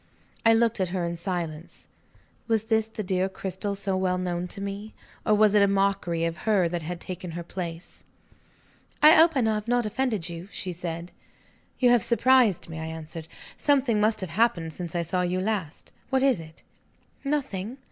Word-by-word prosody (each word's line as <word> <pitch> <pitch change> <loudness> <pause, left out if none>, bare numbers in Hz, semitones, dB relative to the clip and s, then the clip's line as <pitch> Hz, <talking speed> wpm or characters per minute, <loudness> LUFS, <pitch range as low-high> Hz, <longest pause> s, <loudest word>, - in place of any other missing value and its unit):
I 225 - +6
looked 230 -1 +2
at 185 -2 0
her 180 -1 -2
in 170 0 -3
silence. 170 -2 -5 0.6
Was 225 -2 +2
this 220 -1 +1
the 220 -1 -6
dear 185 0 0
Cristel 190 +1 -4
so 195 -1 -2
well 185 -1 +1
known 180 -1 -2
to 190 - -5
me? 200 +2 -6 0.3
Or 215 - +5
was 210 -1 +4
it 210 - +5
a 200 - +5
mockery 195 -4 +1
of 165 0 -2
her 205 -5 +2
that 175 0 -3
had 170 +2 -5
taken 180 0 -6
her 170 - -4
place? 170 -1 -7 1.0
"I 305 - +10
hope 325 +1 +6
I 255 - +3
have 215 -1 0
not 245 -1 +2
offended 215 -5 -1
you?" 170 +1 -7
she 180 - -4
said. 170 0 -5 0.7
"You 245 -2 +4
have 240 -2 +5
surprised 240 -3 +4
me," 160 -1 -7
I 160 - -4
answered. 160 0 -7 0.3
"Something 265 -7 +2
must 215 0 +2
have 185 -4 -5
happened, 175 -5 +1
since 175 +1 -6
I 170 - +1
saw 180 +2 0
you 180 +1 0
last. 190 -6 -3 0.2
What 265 -1 +2
is 265 -8 +3
it?" 160 -1 -13 0.6
"Nothing." 265 -6 -2
190 Hz, 190 wpm, -26 LUFS, 175-220 Hz, 1.0 s, I